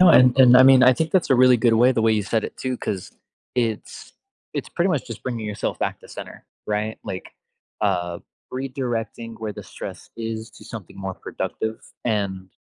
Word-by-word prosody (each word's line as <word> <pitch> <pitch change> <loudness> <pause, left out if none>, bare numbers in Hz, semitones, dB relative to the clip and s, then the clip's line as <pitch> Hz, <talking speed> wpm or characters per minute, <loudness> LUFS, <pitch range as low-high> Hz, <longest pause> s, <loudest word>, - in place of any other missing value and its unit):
No, 185 - +8
and 125 -4 +7
and, 125 -1 +9
I 130 - +9
mean, 130 -1 +8
I 130 0 +8
think 160 +4 -1
that's 180 -5 +2
a - - +7
really 125 0 +6
good 115 -1 +3
way 125 +3 +5
the 115 - 0
way 110 0 +4
you 105 - +1
said 110 +2 0
it - - -6
too, 130 -1 -2
'cause 95 -5 -4 0.4
it's 115 -3 -3 0.4
it's - - -3
pretty 175 +2 0
much 150 -6 -1
just 115 -1 -8
bringing 115 -4 -3
yourself 105 0 -3
back - - -2
to - - -15
center - - -9 0.2
right? 105 +1 -2
Like, 95 - -7 0.5
uh, 90 -4 0 0.3
redirecting 120 -4 -4
where 110 -1 -3
the - - -9
stress - - -9
is 110 0 -4
to - - -14
something 110 -7 -9
more 95 -1 -4
productive. 110 +4 -4 0.2
And, 100 -4 -1
115 Hz, 200 wpm, -23 LUFS, 105-130 Hz, 0.5 s, and